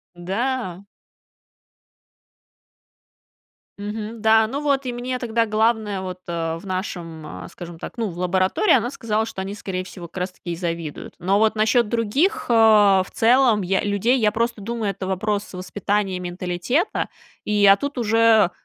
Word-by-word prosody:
Да. 195 +1 -3 2.9
Мгм. 215 +2 -5
Да, 220 0 +4
ну 275 +5 -3
вот 280 -2 0
и 250 - -2
мне 250 +1 -3
тогда 230 -1 0
главное 215 -2 +1
вот 185 -1 -6
в 165 -1 -3
нашем, 175 -5 -5
скажем 170 -2 -10
так, - - -8
ну, 230 -3 -1
в 175 - -10
лаборатории, 185 - +2
она 245 -1 +2
сказала, 220 -4 -1
что 225 -4 -6
они, 195 +1 -4
скорее 185 -3 -4
всего, 180 -2 -10
как 170 - -19
раз 180 0 -4
таки 175 -2 -6
завидуют. 165 -3 -5
Но 190 +3 +2
вот 220 0 +3
насчет 220 +1 +2
других, 275 - 0
в 210 -5 +5
целом, 235 -2 +4
людей, 205 +6 +1
я 210 -2 +2
просто 230 0 -1
думаю, 225 0 -2
это 195 -1 -5
вопрос 200 +2 -2
воспитания, 190 +1 -2
менталитета, 180 - -1 0.4
и, 210 -1 +2
а 195 0 +8
тут 285 +4 -4
уже 225 -3 +4
210 Hz, 145 wpm, -22 LUFS, 185-230 Hz, 2.9 s, а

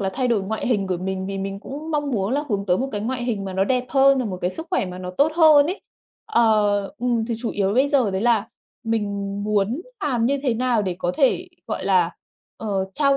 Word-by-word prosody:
là 195 -1 -1
thay 255 -2 0
đổi 215 -5 +2
ngoại 220 +3 -3
hình 205 -6 +1
của 185 -1 -1
mình 190 +1 -3
vì 195 0 -4
mình 195 +1 -4
cũng 300 +7 -7
mong 290 -2 -1
muốn 205 -1 -1
là 290 +2 0
hướng 200 -2 -1
tới 180 0 +2
một 265 - -1
cái 205 - -2
ngoại 245 +3 -2
hình 215 -5 -2
mà 190 - -5
nó 190 +1 +1
đẹp 250 +2 0
hơn, 270 0 +5
rồi 240 -4 -1
một 185 - -5
cái 180 - 0
sức 325 - -7
khỏe - - +1
mà 180 0 -7
nó 180 0 -5
tốt 285 +11 +2
hơn 310 -3 +6
ấy. 370 +4 -3 0.5
Ờ, 215 - +3
ừm, 240 -2 0
thì 235 - -2
chủ 230 -1 -3
yếu 200 0 0
bây 265 +3 +3
giờ 265 -8 +2
đấy 190 0 -2
là 230 -3 +2 0.4
mình 225 -2 0 0.4
muốn 210 - 0 0.2
làm 240 -5 +1
như 280 +2 +1
thế 250 -5 +1
nào 240 -2 +1
để 185 -3 -3
có 175 0 -1
thể, 315 +5 +2 0.2
gọi 215 - -4
là, 180 -3 +3 0.5
ờ, 200 -3 -2
trao 275 -2 +3
225 Hz, 250 wpm, -22 LUFS, 195-265 Hz, 0.5 s, hơn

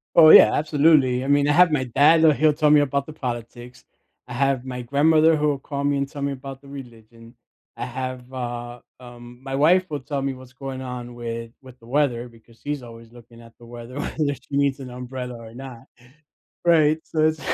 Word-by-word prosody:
Oh 155 -2 +8
yeah, - - +9
absolutely. 145 -4 +2
I - - -5
mean, 145 0 +3
I 145 - +3
have 175 0 +5
my 130 -4 0
dad, 155 +6 +4
l 155 - +7
he'll 155 +1 +3
tell 150 0 +2
me 150 0 +6
about 140 0 -1
the 155 - -10
politics. 120 -2 -7 0.4
I 125 - -8
have 135 0 0
my 125 -1 -6
grandmother 155 +5 +3
who 150 0 0
will 140 -2 -1
call 140 0 -5
me 145 0 +1
and 140 0 -2
tell 145 - -9
me 140 0 -1
about 135 0 -9
the 140 - -17
religion. 115 -4 -13 0.4
I - - -4
have 130 0 -6
a, 120 -1 -6 0.2
um 120 0 -13
my 135 0 -5
wife 175 +6 +3
will 145 -2 -4
tell 140 +1 -4
me 135 0 -2
what's 130 -1 -14
going 130 0 -7
on 125 -2 -7
with 115 -1 -6
with 130 -1 -16
the 115 - -18
weather, 125 -3 0
because 115 0 -21
she's 145 -2 -5
always 115 -1 -13
looking 120 -1 -16
at 115 -1 -16
the 120 - -16
weather 120 +1 -11
whether 145 -1 -2
she 140 +2 -6
needs 140 -1 +1
an 130 - -8
umbrella 125 0 -7
or 115 -1 -12
not. 130 -3 -10 0.8
Right, 155 -2 +4
so 160 - -5
it's 155 0 -2
130 Hz, 215 wpm, -22 LUFS, 120-145 Hz, 0.8 s, yeah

